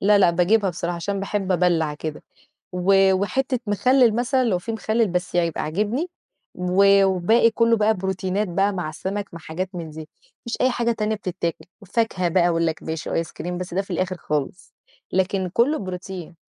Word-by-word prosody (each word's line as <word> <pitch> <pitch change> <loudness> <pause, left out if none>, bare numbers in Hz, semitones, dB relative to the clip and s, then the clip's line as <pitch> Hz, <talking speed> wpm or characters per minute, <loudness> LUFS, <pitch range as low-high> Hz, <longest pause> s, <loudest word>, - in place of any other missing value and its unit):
لا، 205 +1 +5
لا، 190 - +5
باجيبها 190 +4 +2
بصراحة 170 +1 -3
عشان 195 +3 -3
باحب 195 -1 -1
أبلّع 170 -4 +2
كده، 150 0 -6 0.5
و 190 +1 +4
وحتّة 255 +7 0
مخلل 235 +3 +4
مثلًا 255 +2 +1
لو 205 -7 +1
فيه 225 +5 -5
مخلل، 225 +1 +1
بس 180 -1 -3
يبقى 170 -2 +1
عاجبني، 215 - -1 0.5
و 195 +2 +4
والباقي 195 +5 +3
كلّه 230 0 +3
بقى 215 +1 +3
بروتينات 190 +1 -2
بقى، 195 +3 +1
مع 175 -5 -3
سمك، 195 +5 -5
مع 165 - -7
حاجات 170 +4 -4
من 165 -2 -5
دي. 155 0 -9 0.4
مفيش 235 - -3
أي 255 - +4
حاجة 235 -1 0
تانية 220 -1 -1
بتتاكل. 175 -4 -4 0.2
وفاكهة 200 -3 0
بقى، 175 0 +3
أقول 165 -1 +1
لك 160 - -3
ماشي، 160 -1 -4
آيس 165 -1 -1
كريم، 180 +1 -5
بس 180 -1 -6
ده 190 - +1
في 195 - -11
الآخر 185 +1 -1
خالص. 150 +4 -4 0.4
لكن 190 0 0
كلّه 250 - +2
بروتين. 185 - -7
190 Hz, 180 wpm, -23 LUFS, 175-210 Hz, 0.5 s, لا